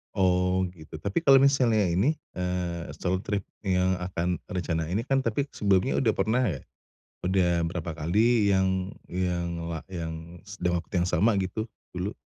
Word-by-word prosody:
Oh, 90 Hz, -1 st, +2 dB
gitu. 80 Hz, -2 st, -12 dB
Tapi 100 Hz, -, -1 dB
kalau 140 Hz, -5 st, +6 dB
misalnya 125 Hz, -6 st, +4 dB
ini, 110 Hz, -, +2 dB, 0.2 s
eee, 90 Hz, -2 st, -2 dB
solo 95 Hz, 0 st, -1 dB
trip 100 Hz, 0 st, -2 dB, 0.2 s
yang 90 Hz, 0 st, +2 dB
akan 90 Hz, -1 st, -2 dB
rencana 85 Hz, -3 st, -2 dB
ini 100 Hz, +7 st, -1 dB
kan, 135 Hz, +1 st, +2 dB
tapi 130 Hz, +2 st, 0 dB
sebelumnya 100 Hz, +3 st, +2 dB
udah 115 Hz, -5 st, +2 dB
pernah 115 Hz, +4 st, +1 dB
enggak? 85 Hz, -, -1 dB, 0.6 s
Udah 90 Hz, -2 st, +2 dB
berapa 85 Hz, 0 st, -3 dB
kali 105 Hz, +6 st, +3 dB
yang 95 Hz, 0 st, +1 dB, 0.2 s
yang 90 Hz, -1 st, -1 dB, 0.2 s
la 80 Hz, -, -3 dB
yang 85 Hz, 0 st, -7 dB
st 100 Hz, +1 st, -11 dB
dalam 90 Hz, 0 st, +2 dB
waktu -, -, -24 dB
yang 90 Hz, -, +1 dB
sama 100 Hz, +4 st, +3 dB
gitu 95 Hz, +4 st, -2 dB, 0.3 s
dulu? 95 Hz, +4 st, -3 dB
95 Hz, 160 wpm, -27 LUFS, 85-105 Hz, 0.6 s, kalau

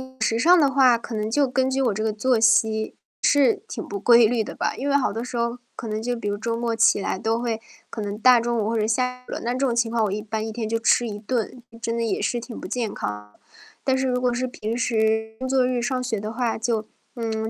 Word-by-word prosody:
嗯， 260 Hz, -, -7 dB
饮 260 Hz, -, -23 dB
食 225 Hz, +1 st, +1 dB
上 350 Hz, +6 st, +6 dB
的 280 Hz, -3 st, +3 dB
话， 255 Hz, -3 st, +5 dB
可 235 Hz, -, -9 dB
能 215 Hz, 0 st, -2 dB
就 280 Hz, +3 st, +2 dB
根 260 Hz, +1 st, +1 dB
据 270 Hz, +1 st, 0 dB
我 245 Hz, -, +2 dB
这 215 Hz, +2 st, -3 dB
个 220 Hz, -, +1 dB
作 225 Hz, +3 st, +1 dB
息， 220 Hz, -1 st, +3 dB, 0.3 s
是 275 Hz, -5 st, +3 dB
挺 -, -, -6 dB
不 200 Hz, -, -5 dB
规 235 Hz, +2 st, +6 dB
律 230 Hz, 0 st, 0 dB
的 -, -, -8 dB
吧。 -, -, -1 dB
因 280 Hz, +2 st, -3 dB
为 280 Hz, -, +2 dB
好 265 Hz, -7 st, +2 dB
多 230 Hz, -, -3 dB
时 245 Hz, -1 st, -5 dB
候， 235 Hz, +1 st, -1 dB, 0.2 s
可 230 Hz, -, -6 dB
能 215 Hz, 0 st, -3 dB
就 245 Hz, +2 st, -1 dB
比 230 Hz, -3 st, -5 dB
如 205 Hz, -, 0 dB
周 230 Hz, +2 st, -2 dB
末 235 Hz, -1 st, -1 dB
起 225 Hz, -, +4 dB
来 190 Hz, -, -2 dB
都 225 Hz, +2 st, 0 dB
会 230 Hz, -2 st, -2 dB, 0.3 s
可 220 Hz, -, -5 dB
能 205 Hz, 0 st, -4 dB
大 245 Hz, +2 st, +6 dB
中 235 Hz, 0 st, -1 dB
午 215 Hz, -, 0 dB
或 230 Hz, -, 0 dB
者 215 Hz, -, +1 dB
下 250 Hz, +2 st, -1 dB
午 -, -, -10 dB
了， -, -, -3 dB
那 240 Hz, +1 st, -1 dB
这 255 Hz, -, -3 dB
种 255 Hz, -4 st, +1 dB
情 235 Hz, -1 st, +1 dB
况 230 Hz, -1 st, +1 dB
我 200 Hz, -, -2 dB
一 210 Hz, -, -2 dB
般 215 Hz, 0 st, -3 dB
1 -, -, -4 dB
天 220 Hz, 0 st, -4 dB
就 225 Hz, +1 st, -1 dB
吃 235 Hz, +1 st, +3 dB
1 210 Hz, -2 st, -5 dB
顿， 240 Hz, +2 st, -3 dB
嗯， 230 Hz, -, -14 dB
真 230 Hz, 0 st, -2 dB
的 235 Hz, -, -1 dB
也 225 Hz, -, -1 dB
是 240 Hz, -, 0 dB
挺 235 Hz, 0 st, -8 dB
不 -, -, -7 dB
健 235 Hz, -4 st, -2 dB
康 105 Hz, 0 st, -5 dB
的。 -, -, -29 dB, 0.4 s
但 265 Hz, -, +2 dB
是 265 Hz, 0 st, 0 dB
如 250 Hz, -1 st, 0 dB
果 250 Hz, -1 st, +1 dB
是 255 Hz, +1 st, -1 dB
平 230 Hz, -2 st, -4 dB
时 220 Hz, -1 st, 0 dB
工 260 Hz, -, -3 dB
作 260 Hz, -1 st, +3 dB
日 250 Hz, -1 st, -1 dB
上 255 Hz, +1 st, -1 dB
学 235 Hz, -4 st, -2 dB
的 215 Hz, +2 st, -5 dB
话， 235 Hz, -1 st, -1 dB
就 225 Hz, -1 st, -1 dB, 0.3 s
嗯， 220 Hz, -2 st, -2 dB
230 Hz, 300 characters per minute, -23 LUFS, 220-250 Hz, 0.4 s, 上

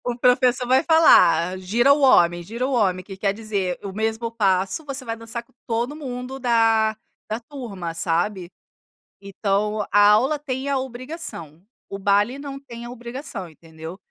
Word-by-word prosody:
O 245 Hz, -1 st, -2 dB
professor 250 Hz, 0 st, +3 dB
vai 260 Hz, +3 st, +4 dB
falar: 185 Hz, -, +5 dB
"Gira 235 Hz, +9 st, +3 dB
o 295 Hz, -, +2 dB
homem, 175 Hz, -10 st, +4 dB
gira 235 Hz, +8 st, -3 dB
o 275 Hz, -, -3 dB
homem", 185 Hz, -7 st, +1 dB
que 195 Hz, 0 st, -9 dB
quer 195 Hz, 0 st, 0 dB
dizer 200 Hz, -4 st, -3 dB
o 195 Hz, -1 st, -6 dB
mesmo 220 Hz, +2 st, -2 dB
passo, 195 Hz, +3 st, 0 dB
você 275 Hz, -2 st, -5 dB
vai 230 Hz, -1 st, -4 dB
dançar 230 Hz, +1 st, -6 dB
com -, -, -32 dB, 0.2 s
todo 240 Hz, +6 st, -1 dB
mundo 260 Hz, -2 st, -6 dB
da 225 Hz, -3 st, +2 dB, 0.3 s
da 220 Hz, +2 st, -3 dB
turma, 225 Hz, -, -7 dB
sabe. 175 Hz, +2 st, -2 dB, 0.7 s
Então, 200 Hz, +2 st, -1 dB
a 205 Hz, +1 st, +6 dB
aula 260 Hz, +8 st, +3 dB
tem 275 Hz, -1 st, -4 dB
a 275 Hz, -, +1 dB
obrigação, 255 Hz, -, -7 dB, 0.3 s
o 195 Hz, -, -5 dB
baile 205 Hz, +5 st, +2 dB
não 280 Hz, -1 st, -7 dB
tem 240 Hz, -3 st, -10 dB
a 240 Hz, -, -7 dB
obrigação, 240 Hz, -, -7 dB
entendeu? 160 Hz, +2 st, -11 dB
225 Hz, 165 wpm, -22 LUFS, 195-255 Hz, 0.7 s, a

